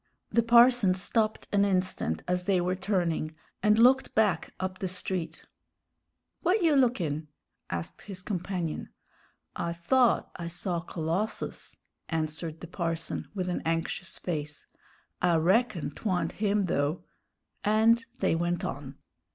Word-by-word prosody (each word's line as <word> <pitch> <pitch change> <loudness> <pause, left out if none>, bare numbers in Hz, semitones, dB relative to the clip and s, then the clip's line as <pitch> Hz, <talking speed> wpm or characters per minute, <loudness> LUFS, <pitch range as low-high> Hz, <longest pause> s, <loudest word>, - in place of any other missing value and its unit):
The 235 - +4
parson 235 -4 +6
stopped 215 +3 0
an 200 -1 +4
instant 185 - 0
as 180 0 0
they 190 -2 +3
were 180 +1 0
turning, 175 -5 -1 0.3
and 210 0 +4
looked 255 +3 +4
back 205 -7 +2
up 185 0 -3
the 190 - -1
street. 180 -1 -4 1.0
"W'at 370 +3 +3
you 320 -3 +4
lookin'?" 175 - +1 0.4
asked 85 -1 -5
his 190 -3 -8
companion. 180 -5 -3 0.7
"I 170 0 -2
thought 240 +9 +2
I 170 -2 -5
saw 175 +1 -1
Colossus," 170 +5 -3 0.3
answered 160 0 -3
the 175 - -7
parson, 165 -2 -3
with 185 -2 -2
an 180 - -1
anxious 165 +2 -2
face; 150 -4 -4 0.6
"I 175 -1 +4
reckon 175 - +2
'twa'nt 185 +2 -1
him, 205 -1 +1
though." 145 -1 0 0.6
And 220 +2 +4 0.2
they - - +3
went 175 +1 0
on. 135 0 -5
180 Hz, 130 wpm, -29 LUFS, 165-210 Hz, 1.0 s, parson